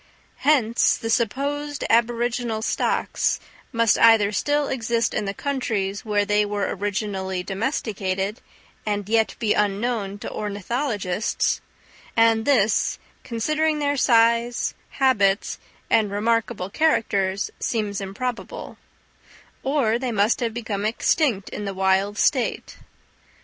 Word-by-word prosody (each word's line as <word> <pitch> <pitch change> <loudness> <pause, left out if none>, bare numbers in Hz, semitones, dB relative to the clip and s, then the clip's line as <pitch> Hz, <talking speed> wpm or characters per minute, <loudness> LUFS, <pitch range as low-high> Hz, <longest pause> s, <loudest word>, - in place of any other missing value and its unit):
Hence 255 -5 +3
the 225 - -3
supposed 285 +5 -1
aboriginal 235 -1 +1
stocks - - 0 0.3
must 230 -3 +3
either 225 -3 +6
still 290 +6 0
exist 235 -2 0
in 210 - -1
the 195 - -2
countries 215 -8 -2
where 205 -2 +1
they 210 0 +3
were 205 -1 -2
originally 195 -2 -2
domesticated, 200 -1 -2 0.4
and 205 -2 -2
yet 225 0 +2
be 220 -3 +1
unknown 205 0 -1
to - - -7
ornithologists; 210 -1 -1 0.6
and 225 0 +4
this, 225 -7 +2 0.3
considering 305 +7 0
their 285 -1 0
size, 235 -1 +3 0.2
habits 205 -8 +2 0.3
and 215 -2 +3
remarkable 215 -1 -1
characters, 200 -10 +1
seems 210 -3 -2
improbable; 230 +6 -5 0.8
or 260 -5 +1
they 255 -1 -2
must 210 +1 +2
have 235 -2 -1
become 220 -3 -4
extinct 225 - +1
in 210 - -5
the 195 -1 -4
wild 190 +2 +1
state. 255 0 0
225 Hz, 115 wpm, -23 LUFS, 200-240 Hz, 0.8 s, either